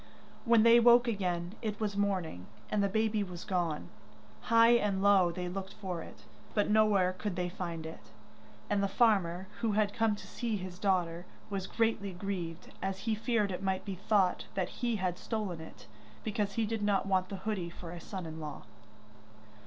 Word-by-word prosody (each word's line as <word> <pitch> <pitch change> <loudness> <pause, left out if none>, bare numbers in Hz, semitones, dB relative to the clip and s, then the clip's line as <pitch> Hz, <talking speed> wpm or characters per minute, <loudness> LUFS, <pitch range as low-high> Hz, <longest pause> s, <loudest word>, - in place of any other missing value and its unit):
When 230 -2 +6
they 235 +1 +8
woke 240 +1 +6
again 180 -5 -1
it 215 -2 -3
was 210 -2 -1
morning, 185 - -1 0.2
and 210 - +2
the 200 - +2
baby 220 +1 +1
was 180 -3 -7
gone. 175 -5 -1 0.6
High 230 0 +7
and 205 -5 +2
low 195 -4 +5
they 180 +1 -4
looked 190 +2 -5
for 185 -5 -4
it, - - -12 0.3
but 210 -1 +2
nowhere 210 -4 +4
could 185 +1 -4
they 180 0 -1
find 170 -3 -5
it, 160 - -9 0.6
and 205 -1 +1
the 200 - +2
farmer, 190 -5 +2
who 225 -2 0
had 210 -1 +2
come 225 -2 +2
to - - -11
see 230 -3 -2
his 185 -1 -7
daughter, 180 -3 0 0.2
was 195 -1 -2
greatly 220 -4 0
grieved, 175 -3 -5
as 190 0 -2
he 225 - 0
feared 215 -2 +1
it 180 - -4
might 190 -1 -1
be 200 - -3
thought 190 0 +1
that 185 -2 0
he 240 -2 -1
had 185 -3 -1
stolen 205 -7 -3
it, 160 - -12 0.4
because 210 -2 -1
he 225 +2 +1
did 220 0 -2
not 205 -2 +2
want 185 -1 +1
the 200 - -4
hoodie 190 -3 -3
for 170 0 -9
a 175 - -7
son 185 -1 -6
in 160 0 -7
law. 150 -1 -6
195 Hz, 190 wpm, -32 LUFS, 180-215 Hz, 0.6 s, they